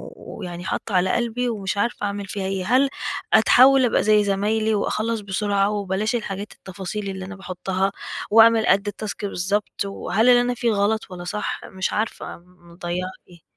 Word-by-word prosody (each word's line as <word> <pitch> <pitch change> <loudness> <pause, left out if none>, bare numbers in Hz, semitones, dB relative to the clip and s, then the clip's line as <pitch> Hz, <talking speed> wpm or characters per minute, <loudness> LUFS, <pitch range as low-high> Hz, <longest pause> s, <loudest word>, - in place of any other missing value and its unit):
و - - -11
ويعني 175 0 -6
حاطّة 200 - -3
على 180 +1 +3
قلبي، 240 +1 -1
ومش 200 -3 -3
عارفة 220 0 -1
أعمل 200 0 -3
فيها 195 0 -4
إيه؟ 190 -1 -2
هل 260 +5 +3 0.4
أتحوّل 255 +4 +6
أبقى 230 - +2
زي 210 -1 +4
زمايلي، 215 +2 +1
وأخلّص 220 +2 -1
بسرعة، 200 0 0
وبلاش 205 +2 -1
الحاجات 205 -2 -4
التفاصيل 195 +2 -6
اللي 190 -1 -5
أنا 200 +1 -8
باحطها، 190 +1 -2 0.4
وأعمل 225 0 +6
قد 200 +1 +3
التاسك 205 0 -5
بالضبط؟ 200 +2 -2
وهل 200 +4 +1
اللي 245 0 +7
أنا 245 0 0
فيه 235 -1 0
غلط، 205 0 0
والّا 175 -1 -7
صح؟ 210 +4 -3
مش 190 0 -3
عارفة 215 +1 -3
م 175 0 -21
مضيّعة 175 +1 -4 0.2
إيه؟ 170 -2 -17
200 Hz, 175 wpm, -22 LUFS, 190-220 Hz, 0.4 s, اللي